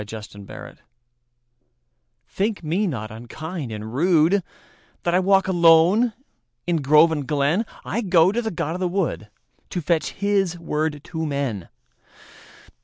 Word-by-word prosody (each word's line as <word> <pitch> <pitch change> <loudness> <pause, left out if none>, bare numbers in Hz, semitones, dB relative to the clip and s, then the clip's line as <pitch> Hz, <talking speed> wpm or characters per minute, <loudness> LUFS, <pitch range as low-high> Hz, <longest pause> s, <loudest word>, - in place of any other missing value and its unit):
The 105 +2 -7
Apology 100 -2 -11 1.4
THINK 205 -1 -2
me 180 +7 0
not 110 -10 -4
unkind 135 +5 -7
and 105 -1 -6
rudeThat 165 - +2 0.7
I 180 - +4
walk 195 0 +3
alone 175 +6 +5 0.5
in 175 -1 +1
grove 150 +3 +5
and 150 -4 -3
glen;I 160 +10 -1
go 180 -4 +4
to 235 +3 -1
the 225 - -2
god 165 -4 -3
of 180 - -5
the 185 -1 0
woodTo 175 - -5
fetch 165 0 0
his 195 -3 0
word 155 -2 -2
to 160 -1 -4
men. 135 - -3
165 Hz, 125 wpm, -22 LUFS, 140-190 Hz, 1.4 s, alone